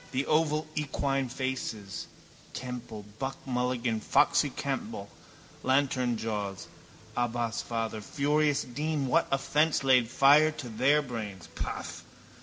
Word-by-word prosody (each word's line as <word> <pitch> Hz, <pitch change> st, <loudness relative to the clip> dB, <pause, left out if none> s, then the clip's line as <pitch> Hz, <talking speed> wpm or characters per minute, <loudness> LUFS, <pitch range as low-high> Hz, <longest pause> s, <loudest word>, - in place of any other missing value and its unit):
The 135 Hz, +2 st, 0 dB
oval 155 Hz, 0 st, +2 dB
equine 135 Hz, -3 st, -1 dB
faces, 125 Hz, -6 st, -4 dB, 0.5 s
Temple, 120 Hz, -4 st, -6 dB
Buck 135 Hz, 0 st, -3 dB
Mulligan, 125 Hz, -3 st, 0 dB
Foxy -, -, +3 dB
Campbell, -, -, -4 dB, 0.5 s
Lanternjaws. 120 Hz, -7 st, 0 dB, 0.5 s
Abbas 120 Hz, -2 st, -1 dB
father, 115 Hz, -2 st, -3 dB
furious 145 Hz, +5 st, +1 dB
dean, 150 Hz, +3 st, -2 dB
what 165 Hz, +6 st, +3 dB
offence 145 Hz, +3 st, +2 dB
laid 130 Hz, -3 st, +5 dB
fire 145 Hz, +5 st, +6 dB
to 155 Hz, -5 st, -7 dB
their 135 Hz, +7 st, +3 dB
brains? 110 Hz, -8 st, -6 dB
Paff! -, -, -5 dB
130 Hz, 105 wpm, -29 LUFS, 115-145 Hz, 0.5 s, fire